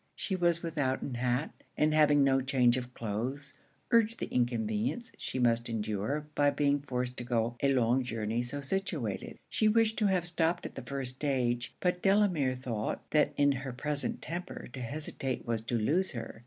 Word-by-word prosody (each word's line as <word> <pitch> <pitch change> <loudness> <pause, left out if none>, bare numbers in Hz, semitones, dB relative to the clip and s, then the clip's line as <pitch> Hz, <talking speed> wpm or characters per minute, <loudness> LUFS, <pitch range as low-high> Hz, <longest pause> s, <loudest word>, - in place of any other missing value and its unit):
She 190 - -2
was 175 -1 +1
without 145 -6 -1
an 135 - -4
hat; 125 +4 0 0.3
and 155 0 +3
having 150 -2 +5
no 135 -1 +3
change 125 -2 +3
of 125 -1 -4
cloaths, 125 +6 -3 0.4
urged 230 -1 +4
the - - -5
inconvenience 120 - 0
she - - -4
must 120 -1 +2
endure 110 +6 -2
by 145 -1 +4
being 145 0 +2
forced 125 -2 -3
to - - -3
go 120 -1 0
a 140 - +3
long 125 0 +3
journey 115 -2 -2
so 135 +4 -4
situated. 145 - -2
She 215 - +2
wished 220 0 +3
to 210 - +3
have 185 -3 +1
stopped 170 -1 0
at - - -6
the - - -6
first 135 -2 -3
stage; 125 -4 0
but 180 0 0
Delamere 190 -10 +3
thought, 120 -4 -4
that 150 -1 +3
in 145 0 +5
her 135 -1 -4
present 145 +3 -2
temper 175 -2 -6
to 130 - -6
hesitate 135 0 -3
was 115 -2 -1
to 120 +1 -1
lose 165 - +2
her. 115 -2 -6
135 Hz, 180 wpm, -31 LUFS, 120-155 Hz, 0.4 s, having